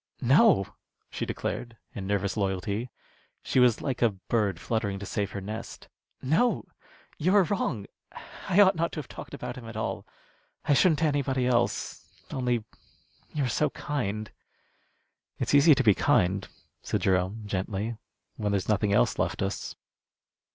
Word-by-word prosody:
"No," 140 - +5 0.5
she - - -3
declared, 120 -2 -4 0.2
in 95 -3 -5
nervous 100 -1 0
loyalty. 100 +3 -2 0.5
She - - +1
was 125 -3 +4
like 135 -4 -2
a 120 - +5
bird 100 -2 -1
fluttering 105 -2 -1
to 100 - -7
save 100 +1 -2
her 100 - -6
nest. 110 +4 -7 0.3
"No! 165 - +2 0.5
You 180 +6 +2
are 200 - +7
wrong. 145 - -1 0.6
I 190 +1 +4
ought 195 -1 +6
not 170 0 0
to - - -4
have 145 - -7
talked - - -9
about - - -6
him 120 -3 -9
at 110 - -7
all. 110 - -3 0.6
I - - +4
shouldn't 160 +2 +4
to - - +4
anybody 140 -4 +1
else. 120 -1 0 0.3
Only, 125 -3 0 0.7
you 150 - -1
are - - +1
so 150 +6 +1
kind." 110 -8 -3 1.1
"It's - - -1
easy 145 +1 +7
to 135 - +1
be 105 - +6
kind," 95 +1 +2 0.3
said - - -2
Jerome, 95 +4 +1
gently, 100 +3 -2 0.4
"when 105 -2 -1
there's 100 -2 -1
nothing 105 -1 +2
else - - +2
left - - 0
us." - - -4
115 Hz, 160 wpm, -28 LUFS, 100-140 Hz, 1.1 s, are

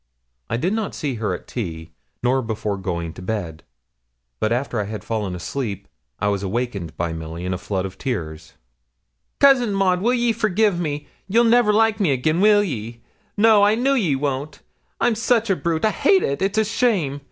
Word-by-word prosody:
I 115 - 0
did 180 - 0
not 220 -2 -2
see 145 -3 -2
her 105 - 0
at - - -12
tea, 80 -9 -5 0.3
nor 130 +2 +2
before 110 -3 -3
going 85 -4 -4
to - - -11
bed; 90 -6 -4 0.8
but 110 - 0
after 120 -1 -1
I 105 - -1
had 110 +1 -6
fallen 105 -5 -3
asleep 105 +2 -4 0.3
I 105 - -1
was 100 -1 -1
awakened 100 -4 -3
by 85 -1 -2
Milly, 80 +2 -6
in 90 0 -1
floods 95 -2 -2
of 95 - -8
tears. 80 - -4 0.9
'Cousin 250 -7 +5
Maud, 185 -2 +2
will 240 +4 +2
ye 240 -1 +2
forgi' 215 -2 +2
me 150 -3 -3 0.2
you'll 230 +5 +4
never 235 -2 +4
like 220 +1 +3
me 195 -6 +2
again, 155 +7 +1
will 205 0 +5
ye? 115 - -5 0.3
No 215 0 +6
I 205 +1 +5
know 260 +4 +2
ye 190 - +2
won't 140 +1 -3 0.4
I'm 240 - +3
such 230 -1 +1
a - - +3
brute 170 +1 -1
I 215 - +3
hate 375 - +3
it 140 +5 -1
it's 195 +2 0
a 220 - +3
shame. 205 - 0
140 Hz, 190 wpm, -22 LUFS, -, 0.9 s, No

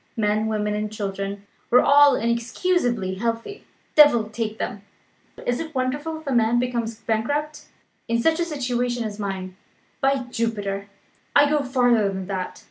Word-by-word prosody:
Men, 215 0 +1
women, 210 -1 -1
and 210 0 -2
children, 200 -1 -4 0.2
were 250 - +6
all 285 -1 +6
inexcusably 235 - 0
healthy 230 - -3 0.3
devil 240 -8 +6
take 220 -1 -3
them! 205 - -4 0.6
Is 245 0 0
it 320 -2 -6
wonderful 290 +5 -2
if 315 - -16
a 275 - -1
man 235 0 +3
becomes 240 -2 -1
bankrupt, 285 +9 -2 0.4
in 230 0 +1
such 320 +7 +2
a 345 - +1
situation 245 -5 -1
as 215 -1 -6
mine? 190 -2 -4 0.4
By 270 -1 +2
Jupiter, 205 -4 -2 0.5
I 290 0 +7
go 300 0 +2
farther 245 -5 +2
than 190 -1 -5
that! 185 -1 -4
235 Hz, 150 wpm, -23 LUFS, 210-275 Hz, 0.6 s, I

